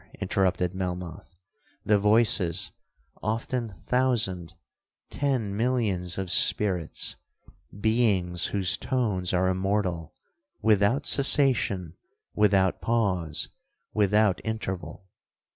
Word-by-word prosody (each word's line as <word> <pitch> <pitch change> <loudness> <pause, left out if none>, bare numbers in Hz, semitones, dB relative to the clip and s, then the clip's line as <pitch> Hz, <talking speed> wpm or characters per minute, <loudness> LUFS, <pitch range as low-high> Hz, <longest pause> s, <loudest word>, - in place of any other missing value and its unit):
interrupted 90 -2 0
Melmoth; 90 -1 -6 0.5
'the 105 -1 +3
voices 100 -4 +3 0.5
often 115 0 -3
thousand—ten 120 - -2
millions 105 -7 -1
of 95 -2 -3
spirits—beings 95 +1 -1
whose 95 -3 0
tones 105 -8 -1
are 95 0 +1
immortal, 95 -3 -2 0.4
without 110 +4 +2
cessation, 120 - +3 0.4
without 100 -3 +2
pause, 95 -9 -1 0.4
without 105 -1 +2
interval!' 95 -4 -5
100 Hz, 75 wpm, -26 LUFS, 90-110 Hz, 0.5 s, the